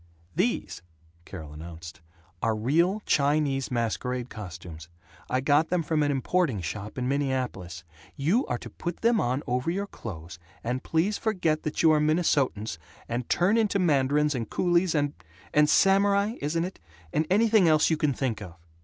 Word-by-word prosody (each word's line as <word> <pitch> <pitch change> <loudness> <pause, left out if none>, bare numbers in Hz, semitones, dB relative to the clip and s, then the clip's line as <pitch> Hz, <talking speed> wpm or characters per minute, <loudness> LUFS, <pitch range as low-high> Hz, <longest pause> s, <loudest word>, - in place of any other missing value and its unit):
"These," 175 - -1 0.4
Carol 80 -6 -9
announced, 85 +2 -10 0.4
"are 115 -1 +1
real 170 - +1
Chinese 140 -2 +1
masquerade 125 +1 -2
costumes. 85 -6 -9 0.4
I 130 +1 +1
got 145 +3 +3
them 180 -2 +1
from 155 0 0
an 145 - +2
importing 140 - 0
shop 100 - -6
in 125 -1 -1
Minneapolis. 130 - -2 0.3
You 170 - +2
are 125 - -1
to - - -10
put 175 0 -5
them 230 -1 +3
on 130 +4 -1
over 125 +5 -1
your 195 +4 -1
clothes, 90 - -9 0.2
and 125 +2 -2
please 180 +6 0
forget 175 -8 0
that 155 - -2
you 160 - +7
are 155 - +4
Minnesotans, 145 - +1 0.3
and 120 +1 -3
turn 190 +6 +3
into 210 -2 +1
mandarins 150 -3 +2
and 120 -4 -4
coolies 175 -1 +1
and 145 -1 +1 0.4
and 150 0 +4
samurai 200 +2 +3
(isn't 165 +3 0
it?), 185 - -8 0.3
and 155 - +1
anything 215 -1 +4
else 155 0 +4
you - - +4
can 150 -1 +1
think 125 -4 -2
of." 90 -5 -9
145 Hz, 160 wpm, -27 LUFS, 115-175 Hz, 0.4 s, you